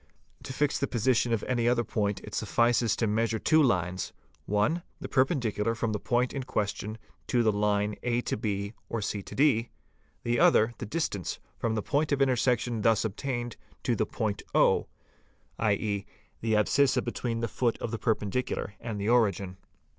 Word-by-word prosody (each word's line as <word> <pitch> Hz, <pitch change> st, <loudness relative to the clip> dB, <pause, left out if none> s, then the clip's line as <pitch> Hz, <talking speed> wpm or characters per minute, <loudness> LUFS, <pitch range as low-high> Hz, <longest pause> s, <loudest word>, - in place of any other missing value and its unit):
To -, -, -7 dB
fix 145 Hz, +2 st, 0 dB
the 140 Hz, -, 0 dB
position 120 Hz, 0 st, +1 dB
of 115 Hz, -2 st, 0 dB
any 120 Hz, -2 st, 0 dB
other 120 Hz, -1 st, +2 dB
point 105 Hz, -2 st, -1 dB
it -, -, -10 dB
suffices 120 Hz, -1 st, +2 dB
to 115 Hz, -, 0 dB
measure 110 Hz, +1 st, +1 dB
two 155 Hz, +8 st, +4 dB
lines: 90 Hz, -, 0 dB, 0.3 s
one, 105 Hz, -, +1 dB, 0.2 s
the -, -, -5 dB
perpendicular 120 Hz, -, +1 dB
from 115 Hz, -1 st, -1 dB
the 105 Hz, -, -1 dB
point 125 Hz, +3 st, 0 dB
in 135 Hz, -, -2 dB
question 105 Hz, -3 st, -3 dB, 0.3 s
to 120 Hz, -1 st, +2 dB
the 110 Hz, -, +4 dB
line 105 Hz, 0 st, +1 dB
a 120 Hz, 0 st, 0 dB
b 100 Hz, -2 st, -2 dB, 0.2 s
or 115 Hz, -, -2 dB
ed, 115 Hz, +3 st, +1 dB, 0.5 s
the 120 Hz, 0 st, +1 dB
other 110 Hz, +2 st, +5 dB
the 115 Hz, -, -5 dB
distance 105 Hz, -, -2 dB, 0.2 s
from 115 Hz, -1 st, 0 dB
the 105 Hz, -, -1 dB
point 150 Hz, +2 st, 0 dB
of 140 Hz, -, +2 dB
intersection 125 Hz, -3 st, +2 dB
thus 110 Hz, 0 st, +3 dB
obtained 120 Hz, +2 st, -3 dB, 0.3 s
to 120 Hz, -, +1 dB
the 110 Hz, -, 0 dB
point 105 Hz, -3 st, -2 dB
o -, -, +4 dB, 0.7 s
(i.e., 100 Hz, -1 st, 0 dB, 0.3 s
the 110 Hz, -1 st, 0 dB
abscissa 130 Hz, +6 st, +3 dB
between 115 Hz, -2 st, -2 dB
the 115 Hz, -, 0 dB
foot 120 Hz, 0 st, 0 dB
of 115 Hz, -, -4 dB
the 115 Hz, -, -3 dB
perpendicular 110 Hz, -1 st, -1 dB
and 110 Hz, -3 st, -5 dB
the 100 Hz, -, -2 dB
origin). 100 Hz, -6 st, +2 dB
115 Hz, 170 wpm, -29 LUFS, 105-125 Hz, 0.7 s, other